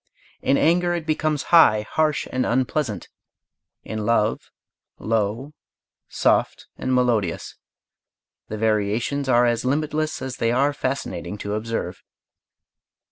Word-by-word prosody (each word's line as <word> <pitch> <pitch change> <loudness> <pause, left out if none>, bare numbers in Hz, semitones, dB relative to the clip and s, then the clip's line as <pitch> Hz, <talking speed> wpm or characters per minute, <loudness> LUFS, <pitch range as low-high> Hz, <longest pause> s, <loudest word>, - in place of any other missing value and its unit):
In 140 - +2
anger 175 +2 +2
it 170 -2 -4
becomes 155 -2 0
high, 110 -11 +7
harsh, 155 -2 0
and 130 0 0
unpleasant; 125 - -1 0.8
in 110 -1 -4
love 110 0 +1 0.5
low, 115 +6 -2 0.6
soft, - - +1
and 130 - -3
melodious 115 -9 0 0.9
the 110 - -5
variations 110 +6 0
are 120 -1 +5
as 120 -1 +1
limitless 155 +3 -1
as 130 0 -5
they 115 - +1
are 140 +4 +2
fascinating 135 -6 -4
to 100 0 -4
observe. 115 +2 -3
125 Hz, 115 wpm, -23 LUFS, 110-145 Hz, 0.9 s, high